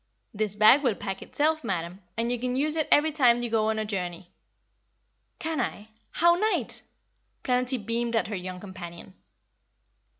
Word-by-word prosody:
"This 210 -1 -2
bag 215 +7 +7
will 245 -7 +1
pack 195 -1 -5
itself, 310 +1 0
madam, 180 -2 -3 0.2
and 230 +1 0
you 245 - -1
can 250 +1 -2
use 300 +3 +1
it 315 -2 0
every 310 +2 +5
time 245 -5 +4
you 240 - -3
go 220 -1 +2
on 220 - 0
a 215 - -1
journey." 180 -4 -5 1.1
"Can 320 -3 -2
I? 215 -2 -4 0.2
How 345 +1 +5
nite!" 425 +5 0 0.6
Planetty 250 +1 +1
beamed 235 +1 -1
at 225 - +1
her 210 - -4
young 185 0 -6
companion. 180 -2 -10
230 Hz, 165 wpm, -27 LUFS, 195-265 Hz, 1.1 s, bag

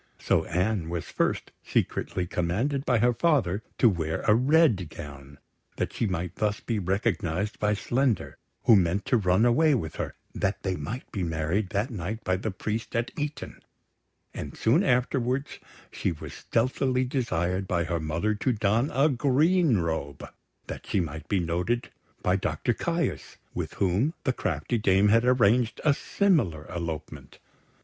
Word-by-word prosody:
So 80 - +1
Anne 90 0 0
was 85 -2 -3
first - - -1
secretly 90 - -1
commanded 110 - -1
by 125 - +4
her 120 +2 +3
father 120 - +1 0.2
to 120 - +5
wear 80 -6 0
a 105 - +4
red 125 - +3
gown, 70 -2 -10 0.4
that - - -2
she 115 - 0
might 90 -2 -3
thus 105 -1 0
be 115 -3 -2
recognised 95 0 -1
by 105 0 +2
Slender, 120 +3 0 0.2
who 115 - +7
meant 95 +1 +2
to 125 - +3
run 95 +1 +3
away 145 +5 +4
with 80 -10 -4
her, - - -4 0.2
that 95 +1 -1
they 95 -2 -1
might 90 - -6
be 100 - -3
married 85 +4 -1
that 105 +6 -1
night 110 +2 -4
by 95 - +1
the 100 +4 -3
priest 110 +4 -4
at 115 +1 0
Eton; 150 -1 -5 0.7
and - - -7
soon - - +3
afterwards 125 +2 0 0.3
she 95 - -1
was 80 - -8
stealthily 130 +2 0
desired 95 - -1
by 85 -1 +1
her 85 +1 -2
mother 80 +7 -1
to 125 +5 0
don 110 +5 +1
a 140 +3 +5
green 145 - +3
robe, 80 -5 -3 0.4
that - - -8
she 100 - +1
might 80 -2 -4
be 100 - +2
noted 90 +8 -1 0.3
by 90 - +3
Doctor 95 - 0
Caius, - - -2 0.2
with - - -4
whom 100 - +1
the 130 - +1
crafty 120 -1 -2
dame 100 0 +4
had 115 +2 +5
arranged 120 -1 +3
a 150 - +6
similar 140 - +1
elopement. 80 -3 -6
105 Hz, 160 wpm, -27 LUFS, 85-125 Hz, 0.7 s, who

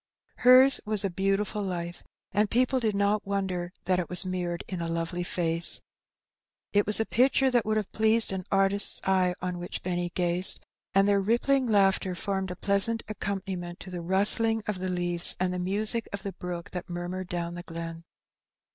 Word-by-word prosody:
Hers 255 +2 +6
was 210 -2 +3
a 195 - -2
beautiful 195 +3 -1
life, 175 -3 -5 0.3
and 210 0 +1
people 255 +2 +1
did 220 -4 -1
not 200 +1 +1
wonder 190 -3 -2
that 185 0 +1
it 175 - -4
was 180 +1 +1
mirrored 180 -2 -3
in 185 -3 -5
a 170 - -3
lovely 165 +1 -3
face. 170 -1 -2 0.9
It 205 -1 +2
was 210 - +6
a 225 - +1
picture 265 +3 +2
that 240 -3 +2
would 215 0 +1
have 210 -3 -3
pleased 220 0 +3
an 190 -1 -4
artist's 195 +1 +3
eye 185 -2 +1
on 180 -1 -3
which 175 - -6
Benny 175 -1 -2
gazed, 180 +1 +2 0.3
and 195 +1 +4
their 200 -1 +3
rippling 245 +5 +1
laughter 195 -3 +2
formed 190 +1 -3
a 180 - -5
pleasant 205 +4 +2
accompaniment 190 -4 -5
to 185 - -9
the 175 -1 -5
rustling 205 +5 +2
of 210 -3 -3
the 185 0 -3
leaves 175 -1 +1
and 180 0 0
the 180 - -3
music 210 +5 -1
of 200 - -6
the 195 - -5
brook 175 -1 -7
that 180 -1 -6
murmured 175 +1 -5
down 170 -1 -4
the 175 - -7
glen. 165 -1 -7
190 Hz, 185 wpm, -27 LUFS, 175-210 Hz, 0.9 s, Hers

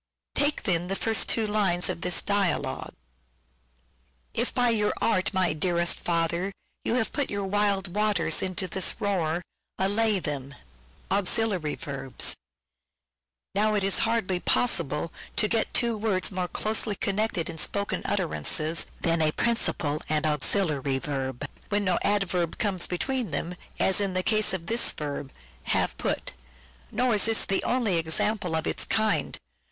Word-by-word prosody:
Take 290 +1 +1
then 175 -4 +1
the 195 - -1
two - - -7
first 225 +1 +2
lines 205 -5 +2
of - - -3
this 180 -2 +1
dialogue: 200 -3 0 0.7
— - - -40
"If - - -1
by 245 -1 +2
your 210 -2 +1
art, 215 -5 +1
my 185 -4 +2
dearest 175 +2 +1
father, 170 +2 0 0.3
you 230 - 0
have 225 -3 0
Put 285 -2 -1
the 200 - -4
wild 195 -2 0
waters 205 -6 +2
in 185 -1 -3
this 185 +1 0
roar, 175 -4 0 0.3
allay 205 +2 +3
them." 140 -5 -4 0.6
Now, 200 - +3 2.5
it 205 - +1
is 195 0 +3
hardly 225 -5 +1
possible 170 - +1 0.2
to 215 - +3
get 225 0 +1
two 235 -1 +1
words 205 -4 0
more 185 -1 -1
Auxiliary - - -4
closely 210 -1 +1
connected 200 -3 0
in 165 -1 -3
spoken 200 +5 0
utterances 165 -3 +1
than 165 -1 +2
a - - +4
verbs 155 - +1
Principal 155 -10 0
and 155 0 +1
an 155 - +3
Auxiliary 145 -3 0
Verb, 135 -1 -4 0.2
when 205 -1 0
no 180 -2 +2
adverb 180 -5 0
comes 195 -5 +1
between 250 +6 -1
them, 175 - -3 0.3
as 190 +2 +3
in 195 -2 -1
the 185 - +1
case 215 +1 +3
of 180 -3 -3
this 230 +5 +2
verb, 145 -2 -5 0.2
" 65 +2 -28
have - - +1
put." - - -2 0.6
Nor 245 +2 +1
is 210 - +4
this 225 0 +2
the 195 - 0
only 235 -8 +1
example 175 +2 0
of 160 - -1
its - - +1
kind. 220 -1 +1
190 Hz, 155 wpm, -27 LUFS, 165-210 Hz, 2.5 s, a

